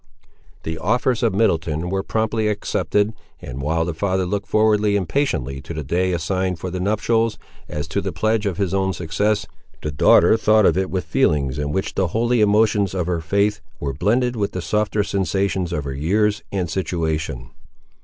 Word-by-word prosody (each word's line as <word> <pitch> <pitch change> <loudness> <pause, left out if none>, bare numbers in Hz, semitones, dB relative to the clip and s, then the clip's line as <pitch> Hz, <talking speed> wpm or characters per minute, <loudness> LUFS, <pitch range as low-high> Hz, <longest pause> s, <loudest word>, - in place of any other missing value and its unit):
The 80 0 -4
offers 120 +6 +1
of 115 -5 +1
Middleton 85 -5 0
were 95 0 0
promptly 110 +1 -1
accepted, 105 0 0 0.3
and, 65 +2 -7
while 80 +3 0
the 85 - -3
father 95 +2 0
looked 100 +2 -3
forward 110 -1 +3
impatiently 100 - 0
to 80 +3 -7
the 75 - -3
day 90 +6 0
assigned 90 +1 -1
for 90 +2 -5
the 90 - -3
nuptials, 110 +3 +1 0.3
as 75 0 -4
to 100 +5 -1
the 95 -1 -3
pledge 110 +1 0
of 95 -4 -2
his 95 -2 -1
own 95 -1 +1
success, 100 +6 0 0.4
the 75 - -2
daughter 75 +9 +5
thought 110 -1 +4
of 80 - +4
it 95 0 0
with 95 -1 -2
feelings 70 -2 +1
in 75 -1 -2
which 95 +6 -2
the 95 - +1
holy 120 0 +2
emotions 105 -2 +3
of 90 -3 0
her 85 -1 -1
faith 100 +5 +1 0.2
were 70 -2 -3
blended 120 - +1
with 100 -3 -2
the 90 - -3
softer 105 +1 0
sensations 95 -2 -1
of 75 -4 -2
her 70 -1 -4
years 105 +9 +1
and 95 -3 -1
situation. 80 -5 -2
95 Hz, 185 wpm, -21 LUFS, 80-105 Hz, 0.4 s, daughter